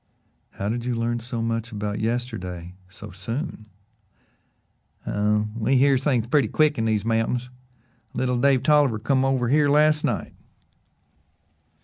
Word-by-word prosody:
"How 100 - -4
did 115 +2 -2
you 125 0 -2
learn 120 +1 -1
so 115 0 -4
much 115 0 -2
about 105 -1 -3
yesterday 95 -7 -4 0.2
so 105 +1 -11
soon?" 110 - -5 1.4
"Oh, 105 +1 0
we 115 +4 +1
hears 135 0 +3
things 125 -6 +1
purty 130 0 +2
quick 150 +4 +2
in 115 - 0
these 110 -2 0
mountains. 115 +2 -1 0.6
Little 125 -1 0
Dave 135 -2 +3
Tolliver 145 -6 +4
come 130 +4 +1
over 130 -3 +1
here 145 +2 +4
last 150 +1 +3
night." 120 - -2
120 Hz, 135 wpm, -24 LUFS, 110-135 Hz, 1.4 s, Tolliver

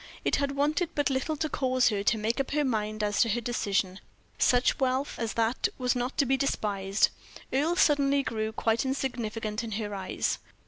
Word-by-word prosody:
It - - +2
had 280 -1 -1
wanted 300 +4 +1
but 290 -1 +1
little 270 +4 -1
to 310 - -1
cause 255 -4 +2
her 205 -3 -1
to 220 - +3
make 220 +4 -1
up 275 - -1
her 295 0 +2
mind 215 -3 -1
as 205 -1 +1
to 230 - +3
her 230 +3 +1
decision 200 -5 -1 0.4
such 245 0 +3
wealth 265 +1 0
as 230 -2 -2
that 230 +2 +1
was 250 -1 0
not 245 +2 -2
to 285 - +3
be 270 +1 +2
despised. 200 -7 +1 0.4
Earle 305 +6 +2
suddenly 280 -3 +3
grew 220 -2 -2
quite 225 +2 0
insignificant 235 -5 -3
in 225 -2 -5
her 205 0 -3
eyes. 190 -2 -2
245 Hz, 190 wpm, -28 LUFS, 215-275 Hz, 0.4 s, to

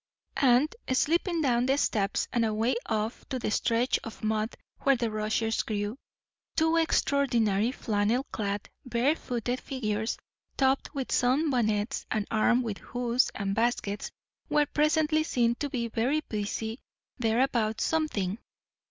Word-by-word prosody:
And, 265 - +4 0.2
slipping 335 +5 +2
down 245 -2 +2
the 270 +1 +3
steps 200 -7 0
and 235 -2 +2
away 225 +3 +1
off 220 +1 -2
to 265 - -1
the 235 - -2
stretch 235 +4 +1
of 225 - -9
mud 215 +1 0 0.2
where 275 -1 +4
the 235 -2 -1
rushes 215 +1 0
grew, 205 0 -2 0.6
two 320 +1 +3
extraordinary, 240 -9 +2
flannel 220 +1 0
clad, 205 -2 -2 0.2
barefooted 245 -1 0
figures, 220 -4 -2 0.4
topped 270 +2 +1
with 270 -2 -3
sun 275 +5 +2
bonnets 215 0 0
and 215 -2 0
armed 240 +3 +3
with 215 -4 -4
hoes 245 +1 0
and 195 -1 -1
baskets, 225 -2 -1 0.4
were 295 0 +3
presently 310 +1 +2
seen 240 -6 +2
to 290 - -2
be 235 -3 -2
very 250 +7 0
busy 220 0 -4 0.4
there 230 0 +2
about 225 -5 +1
something. 225 -11 0
240 Hz, 135 wpm, -28 LUFS, 215-270 Hz, 0.6 s, And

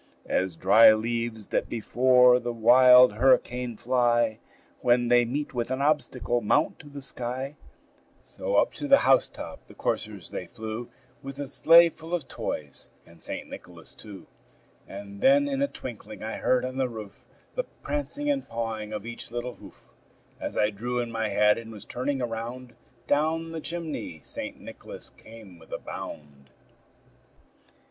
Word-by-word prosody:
As 95 -2 -1
dry 110 +6 +7
leaves 115 -1 -3
that - - -1
before 125 +2 +4
the 120 -1 -3
wild 125 +1 +7
hurricane 125 0 +2
fly, 120 -2 +1 0.4
When 120 0 +2
they 120 0 +5
meet 140 +5 -3
with 120 -1 -2
an 130 0 -2
obstacle, 140 -4 0
mount 145 +8 +1
to 145 - -13
the 140 -1 -9
sky, 130 +3 -4 0.7
So - - -4
up - - +3
to 290 - -2
the 275 0 +7
house 135 - +4
top - - -9
the - - -15
coursers - - -3
they 90 - -5
flew, 110 +3 -6 0.3
With 135 0 -7
the 140 0 -5
sleigh 170 +5 +7
full 165 +2 -5
of 170 - -5
toys, 70 -3 -5 0.2
and 85 -1 -19
St. - - -5
Nicholas 85 -2 -10
too. 105 -3 -11 0.6
And 100 0 -9
then 285 +1 +5
in 275 -1 -2
a 280 - +3
twinkling 110 - -9
I 110 - -4
heard 130 0 +1
on 130 +1 -5
the 130 -1 0
roof 110 -4 -10 0.3
The - - -2 0.2
prancing 290 0 -3
and 285 -2 -1
pawing 110 -2 -4
of 105 0 -5
each 115 0 -7
little 120 +1 -4
hoof. - - -13 0.5
As - - -5
I 105 0 +3
drew 120 +4 -3
in 120 -1 -3
my 110 -1 -1
head, 105 +2 +3
and 115 -1 -10
was 105 -2 -10
turning 130 +1 -2
around, 120 +2 -5 0.3
Down 160 +4 0
the 165 -1 -5
chimney 155 - -5
St. - - -7
Nicholas - - -9
came 110 -6 -14
with 80 - -18
a - - -2
bound. 70 -2 -9
120 Hz, 165 wpm, -27 LUFS, 110-135 Hz, 0.7 s, dry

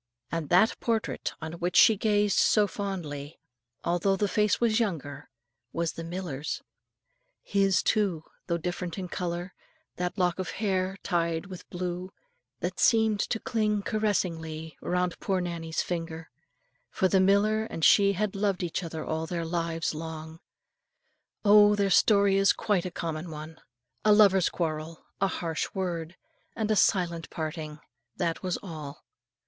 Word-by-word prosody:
And 165 -3 -3
that 185 +6 +4
portrait 225 -2 -1
on 160 0 -5
which 175 0 -2
she 220 - +7
grazed 205 -1 +2
so 210 -1 +4
fondly, 170 -8 -5 0.4
although 175 +3 +1
the 205 +2 0
face 210 0 +2
was 230 -1 +2
younger, 165 - -3 0.4
was 170 -1 -1
the 165 - -7
miller's; 165 -4 -4 0.8
his, 195 -2 +2
too, 195 -7 +1 0.2
though 170 -2 +1
different 175 +1 -4
in 185 -2 -5
colour, 175 +1 -4 0.4
that 180 0 -2
lock 180 -1 +1
of 185 - -3
hair 190 -2 0
tied 170 -2 0
with 185 -2 -10
blue, 180 +1 -4 0.5
that - - -3
seemed 220 -3 +4
to 225 - -1
cling 215 -4 0
caressingly 165 -7 -2
around 180 -1 -1
poor 190 -2 0
Nannie's 170 -2 -3
finger. 165 -2 -5 0.6
For 190 - +1
the 190 +1 +3
miller 205 +3 +3
and 165 -7 -1
she 200 -1 +6
had 205 +1 -1
loved 195 -2 0
each 175 +1 -2
other 160 -2 -5
all 160 +1 -2
their 170 0 -3
lives 165 -1 -1
long. 160 0 -7 1.1
Oh! 210 0 +7
their 200 -1 +1
story 200 +1 +5
is 195 0 +5
quite 200 -5 0
a - - -4
common 165 0 -4
one, 155 +1 -9 0.4
a 215 - +6
lover's 195 -4 +5
quarrel, 160 -1 -4 0.2
a 195 - +4
harsh 165 -4 -2
word, 175 -3 -3 0.4
and 220 -1 -1
a - - +3
silent 175 -4 +2
parting: 155 -1 -5 0.4
that 170 -3 -1
was 185 -2 -1
all. 155 -6 -8
180 Hz, 150 wpm, -28 LUFS, 165-200 Hz, 1.1 s, she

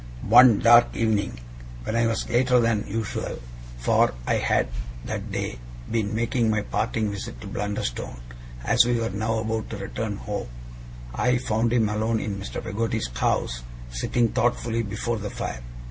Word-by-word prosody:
One 120 0 +8
dark 120 +2 +6
evening, 110 - 0 0.4
when 110 - -2
I 115 0 +3
was 115 - -1
later 125 +1 +3
than 115 -2 +1
usual 110 +1 -3 0.4
for - - +3
I - - +2
had, - - +2 0.4
that - - -4
day, - - -3 0.3
been 110 -2 0
making 115 0 +1
my 105 -1 +1
parting 110 0 -1
visit 100 -11 -6
to - - -8
Blunderstone, 100 -13 -3 0.4
as - - +5
we 120 0 +1
were 115 -2 -1
now 110 +3 -1
about 110 0 -2
to 110 - -5
return 105 +1 -4
home 105 - -4 0.7
I 125 - +2
found 115 -1 0
him 115 -3 +3
alone 110 +2 0
in 100 -2 -3
Mr. 100 - -5
Peggotty's 110 - -1
house, - - 0 0.3
sitting 115 - +1
thoughtfully 115 -1 0
before 110 +2 -2
the 105 0 -4
fire. 60 - -5
110 Hz, 160 wpm, -25 LUFS, 105-115 Hz, 0.7 s, One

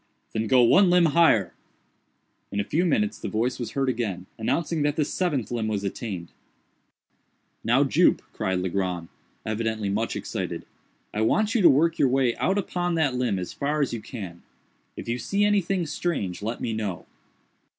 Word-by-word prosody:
"Then 110 0 -1
go 125 +2 +5
one 185 +10 +6
limb 175 -1 +5
higher." 160 - +4 1.0
In 100 - -2
a - - +2
few 160 - 0
minutes 105 -8 +1
the - - -4
voice 120 +4 -1
was 120 - -5
heard 135 -1 0
again, 110 -8 -2
announcing 160 +7 0
that 145 0 +1
the 150 - +1
seventh 145 - -1
limb 115 -2 -1
was 105 -2 -2
attained. 95 -4 -5 1.3
"Now, - - +4
Jup," - - +3
cried 95 -1 -1
Legrand, 90 -2 -2 0.4
evidently 110 -1 -1
much 110 +3 -1
excited, - - -4 0.5
"I 105 - -1
want 215 - +2
you 235 - +2
to 180 - +8
work 160 +5 +3
your 135 - +4
way 130 -2 +2
out 190 - +1
upon 175 -3 -1
that 150 -5 +2
limb 125 -6 0
as 90 -1 -5
far 145 +2 -1
as 140 -4 0
you 115 - -4
can. 95 -10 -8 0.6
If - - -7
you 120 +1 -1
see 200 +8 +1
anything 195 -3 +1
strange, 140 - -2
let 115 +3 -4
me 115 - -2
know." 105 -5 -3
120 Hz, 175 wpm, -25 LUFS, 105-160 Hz, 1.3 s, to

